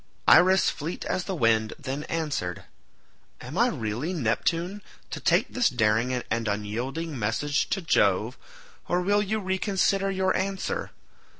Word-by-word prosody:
Iris 185 +2 +6
fleet 160 +4 -5
as 180 - -2
the 190 - -3
wind 115 -5 +2
then 140 +1 -5
answered, 145 - -3 0.8
"Am - - -8
I - - +4
really, 115 - -3
Neptune, 170 - -1 0.3
to - - -4
take - - +2
this 250 -3 +2
daring 115 -1 +1
and 115 -2 -2
unyielding 120 +9 -3
message 115 +7 0
to 195 - -1
Jove, 105 - +2 0.5
or 175 - +1
will 205 +3 +2
you 215 +2 -1
reconsider 195 0 0
your 190 -1 +1
answer? 195 - -2
150 Hz, 135 wpm, -26 LUFS, 115-190 Hz, 0.8 s, Iris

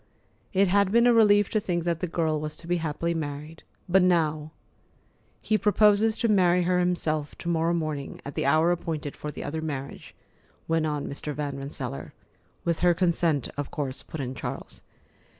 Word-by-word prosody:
It 195 0 +3
had 200 +1 +3
been 235 +2 +5
a 245 - +6
relief 205 -3 +5
to 215 - +1
think 175 -4 -2
that 170 -1 -1
the 180 - -2
girl 160 -2 0
was 150 0 -5
to - - -12
be 175 +1 0
happily 165 +1 -2
married. 150 0 -5 0.3
But 190 +1 +4
now! 155 -4 +1 0.9
"He 215 -1 +1
proposes 210 +1 +4
to 235 - +1
marry 180 -4 +4
her 180 +1 +2
himself, 155 -4 0
to - - -8
morrow 170 0 +1
morning, 155 -4 -4
at 140 - -6
the - - -1
hour 155 +4 +4
appointed 160 -4 -3
for 150 - -6
the - - -7
other 160 +2 -4
marriage," 140 -3 -6 0.5
went 165 -1 +1
on 150 -2 -2
Mr. 145 +1 -5
Van 145 -2 -3
Rensselaer. 140 +1 -6 0.5
"With 170 -1 0
her 175 -1 +4
consent, 170 -5 +1
of 145 -1 -4
course," 140 -3 -3
put 160 - -8
in 130 -2 -3
Charles. - - -7
165 Hz, 185 wpm, -26 LUFS, 150-180 Hz, 0.9 s, a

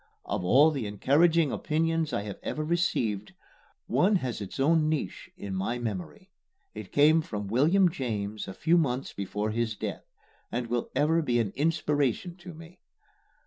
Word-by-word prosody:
Of 100 -1 -2
all 140 - +5
the 135 -8 -3
encouraging 150 - +3
opinions 165 0 0
I 100 - -1
have 105 -1 -7
ever 155 - -3
received, 120 - -1 0.5
one 180 - +3
has 130 - -2
its 100 +6 -7
own 155 +2 +3
niche 150 -12 -3
in 100 -1 -6
my 95 +6 -2
memory. 95 -10 -6 0.4
It 105 -3 -9
came 155 +3 +5
from 105 -9 -5
William 160 - +4
James 110 - -3
a 95 - -7
few 170 +2 +3
months 130 -4 -1
before 105 +2 -3
his 115 -1 -1
death, - - -5 0.4
and 120 +2 -2
will 120 0 -2
ever 155 +4 +3
be 120 -6 +1
an 105 -4 0
inspiration 150 +1 0
to 180 0 -10
me. 165 +3 -13
135 Hz, 160 wpm, -28 LUFS, 105-160 Hz, 0.5 s, all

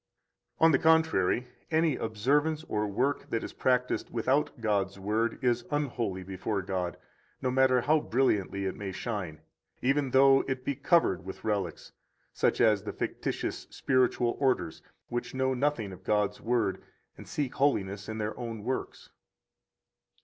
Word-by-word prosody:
93 - - +6
On 165 - +7
the 135 - +4
contrary, 160 - +3 0.2
any 160 -2 +2
observance 145 +9 0
or 105 0 -1
work 130 +8 -1
that 115 - -1
is - - -6
practised 125 -1 0
without 135 +4 0
God's 100 -4 0
Word 110 +4 0
is 120 -1 +2
unholy 120 -10 -2
before 95 +2 -3
God, 90 -2 -3 0.4
no 130 - -1
matter 130 -1 +4
how 155 +5 +3
brilliantly 105 -8 0
it 95 - -2
may 100 -2 -5
shine, 90 -7 -4 0.4
even 135 +1 +1
though 135 +1 +6
it 130 -1 -3
be 140 - 0
covered 140 - +2
with 95 - -8
relics, 100 -7 -2 0.4
such - - +1
as - - +4
the - - -6
fictitious - - -3
spiritual 125 -2 +1
orders, 130 - 0 0.3
which 120 +2 -4
know 130 0 +1
nothing 130 -6 -1
of 95 +1 -13
God's 105 0 0
Word 115 -5 0 0.3
and - - -12
seek 140 -4 -2
holiness 100 -8 0
in 110 - -4
their 110 0 -3
own 115 -3 -5
works. 130 +4 -4
120 Hz, 150 wpm, -29 LUFS, 100-135 Hz, 0.4 s, On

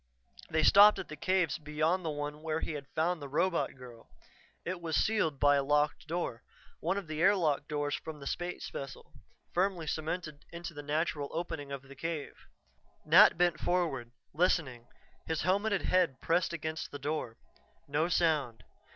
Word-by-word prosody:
They 160 0 +1
stopped 205 +5 +8
at - - -6
the 155 - -6
cave 185 +1 +1
beyond 155 +5 0
the 165 - -2
one 150 0 -4
where 160 0 -1
he - - -3
had 145 -3 -6
found 165 +1 +1
the 140 - -7
robot 170 +4 0
girl. 125 -3 -13 0.6
It 180 0 -4
was 165 -2 -2
sealed 165 -10 +1
by 145 0 +5
a 140 - +1
locked 150 +2 +1
door, 160 -8 -3 0.4
one 180 +5 -1
of 200 - -4
the 155 0 -4
airlock 170 -7 +3
doors 145 -1 -2
from 155 0 -5
that 140 - -10
space 175 +4 -4
vessel, 135 0 -8 0.4
firmly 180 -2 +1
cemented 155 -1 -4
into 170 0 -7
the 145 - -7
natural 145 0 -1
opening 160 -4 -4
of 140 -1 -5
the 135 0 -13
cave. 165 0 -5 0.6
Nat 170 +5 +7
bent 175 -2 +2
forward, 160 -10 0 0.2
listening, 150 -8 +1 0.4
his 160 -1 -1
helmeted 200 +2 +1
head 175 -8 +2
pressed 170 +2 +1
against 160 -1 -4
the 145 - -7
door. 145 -5 -3 0.5
No 150 +3 +1
sound. 150 -11 +1
155 Hz, 170 wpm, -31 LUFS, 145-175 Hz, 0.6 s, stopped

